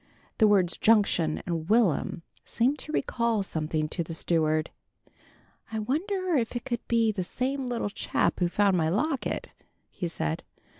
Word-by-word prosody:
The 220 - +6
words 190 -4 +3
"Junction" 200 -8 +3
and 165 -2 -3
"Will'm" 205 -6 +2 0.2
seemed 260 +5 0
to 305 - -7
recall 235 -7 0
something 155 -3 -2
to 170 - -2
the 165 0 -5
steward. 155 -1 +1 1.0
"I 220 - -3
wonder 355 - -1
if 235 -1 -1
it 240 - -4
could 240 -3 -1
be 230 -2 +3
the 195 -3 -3
same 260 +7 -2
little 235 -4 -2
chap - - 0
who 175 - +3
found 200 +1 +3
my 160 -3 +2
locket," 265 - -1 0.4
he 175 - -3
said. 165 0 -3
210 Hz, 155 wpm, -27 LUFS, 170-240 Hz, 1.0 s, The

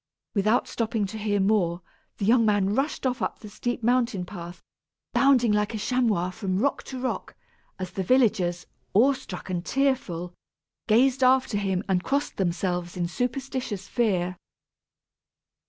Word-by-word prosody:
Without 215 +4 +2
stopping 220 -2 -1
to 210 +3 -6
hear 205 -1 0
more, 190 -4 +1 0.3
the 200 - -2
young 230 +2 +5
man 205 -2 +2
rushed 275 +4 -1
off 250 -1 0
up - - -2
the 210 - -11
steep 240 +3 -3
mountain 235 -5 +1
path, 175 -2 -9 0.5
bounding 260 -5 +4
like 210 +1 +1
a - - -1
chamois 215 -6 +1
from 185 -2 -2
rock 275 +8 +1
to 260 - -8
rock, 255 0 -3 0.4
as 185 -1 -5
the 195 - -3
villagers, 190 -5 +2 0.3
awe 260 +7 +6
struck 195 -8 -8
and 175 -1 -2
tearful, 220 -8 -1 0.5
gazed 255 +4 +4
after 255 -4 +3
him 190 -1 -1
and 185 -2 +1
crossed 285 +1 -1
themselves 175 -1 -1
in 175 -1 0
superstitious 250 -1 -3
fear. 185 -6 0
210 Hz, 150 wpm, -26 LUFS, 185-250 Hz, 0.5 s, awe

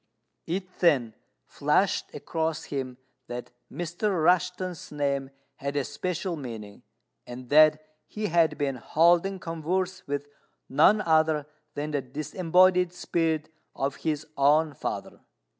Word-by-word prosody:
It 185 +2 -4
then 130 -10 +3 0.3
flashed - - +1
across 160 -1 -2
him 130 -3 -4 0.3
that 120 0 -6 0.2
Mr. 175 +5 -2
Rushten's 180 0 +1
name 140 -2 -1 0.3
had 140 +1 -4
a 145 - +1
special 180 +5 -3
meaning, 115 -8 -8 0.5
and 125 0 -9
that 155 +1 +6 0.2
he 215 0 -4
had 165 -5 +2
been 140 -3 -1
holding 170 +8 +3
converse 175 +2 -3
with 145 0 -2 0.4
none 165 +10 +5
other 160 -4 +2 0.3
than 150 +1 -3
the 145 -2 0
disembodied 180 +6 +2
spirit 160 -3 -1 0.3
of 135 +1 -2
his 155 -1 -2
own 150 +2 +4
father. - - -5
155 Hz, 120 wpm, -27 LUFS, 140-175 Hz, 0.5 s, that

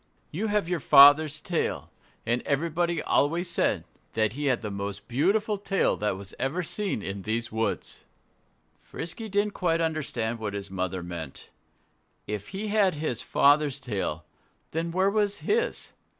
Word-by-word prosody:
"You 205 +8 -2
have 210 -4 +1
your 175 -1 -1
father's 145 +2 +7
tail. 170 +1 -2 0.3
And 120 +1 +1
everybody 165 +3 0
always 170 +5 +1
said - - +1 0.3
that 110 -1 +1
he 145 +3 -4
had 130 -4 +1
the 105 - -3
most 100 +1 -5
beautiful 200 - +1
tail 195 -1 +1
that 105 -2 -1
was 100 0 -8
ever 160 +7 -1
seen 195 - -2
in 95 0 -5
these 115 +4 -2
woods." 110 +1 -2 0.7
Frisky 220 +7 -7
didn't 205 +1 +1
quite 165 -3 +1
understand 140 -8 -2
what 105 -2 -4
his 100 -1 -5
mother 95 -1 -3
meant. 85 -5 -8 0.7
If 105 -1 -5
he 210 +2 -5
had 200 -5 +3
his 145 -6 -3
father's 145 0 +3
tail, 95 - -3 0.5
then 165 +2 -2
where 190 +3 +2
was 205 -1 0
his? 465 +3 0
145 Hz, 150 wpm, -27 LUFS, 110-180 Hz, 0.7 s, father's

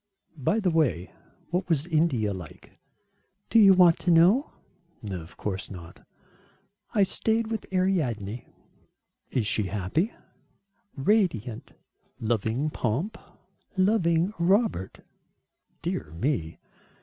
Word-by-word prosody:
"By 160 - 0
the 190 -5 +1
way, 125 - 0 0.4
what 180 +1 -1
was 155 -3 +1
India 155 - +1
like?" 90 -4 -11 0.7
"Do 230 - +6
you 195 -3 +8
want 175 -3 +6
to 180 - -2
know?" 180 - +5 0.6
"Of 90 -3 -7
course 95 -2 -4
not." 85 -4 -11 0.9
"I 205 - +5
stayed 220 +3 0
with 220 -2 -4
Ariadne." 130 - -1 0.8
"Is 120 - 0
she 105 -1 +1
happy?" 105 - -1 0.8
"Radiant." 135 - 0 0.5
"Loving 115 +6 -1
pomp?" 135 - -2 0.6
"Loving 185 -2 +2
Robert." 190 - +1 0.8
"Dear 75 - -3
me." 100 - -1
155 Hz, 100 wpm, -26 LUFS, -, 0.9 s, you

